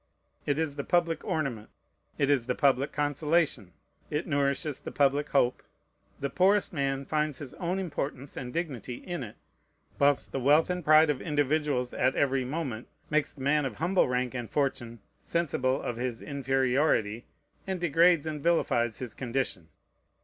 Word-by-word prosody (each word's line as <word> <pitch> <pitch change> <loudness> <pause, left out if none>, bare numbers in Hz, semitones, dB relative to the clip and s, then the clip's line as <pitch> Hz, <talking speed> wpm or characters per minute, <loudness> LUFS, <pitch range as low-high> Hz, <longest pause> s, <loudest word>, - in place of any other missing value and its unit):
It 145 - +1
is 155 -3 -2
the 140 - -2
public 170 -1 +1
ornament. 130 -9 -2 0.5
It 140 0 +2
is 130 -4 +1
the 125 - 0
public 140 -1 +2
consolation. 145 - 0 0.4
It 150 +3 -2
nourishes 140 0 0
the - - -7
public 145 +1 +2
hope. 125 -3 +2 0.6
The 140 - -2
poorest 195 +2 +3
man 140 -2 -1
finds 150 -2 -1
his 140 -2 -8
own 180 +2 -2
importance 145 -6 -4
and 125 -1 -5
dignity 130 -6 -4
in 175 +4 -6
it, 110 -4 -7 0.6
whilst 140 -1 +3
the 135 - -2
wealth 150 +7 +4
and 180 -1 -3
pride 155 0 +6
of 140 - -4
individuals 145 -4 0
at 130 +1 +1
every 135 -1 +1
moment 130 -5 -4 0.2
makes 150 -1 +1
the 135 - -13
man 145 +2 +2
of 130 -6 -3
humble 175 - +2
rank 125 0 -1
and 120 -3 -5
fortune 120 -5 -2 0.2
sensible 135 -6 0
of 120 - -4
his 125 -1 -3
inferiority, 130 -4 +1 0.4
and 190 -1 -2
degrades 170 -1 +4
and 155 -2 -4
vilifies 120 -8 +1
his 125 -4 -6
condition. 120 -10 -3
140 Hz, 160 wpm, -29 LUFS, 130-155 Hz, 0.6 s, pride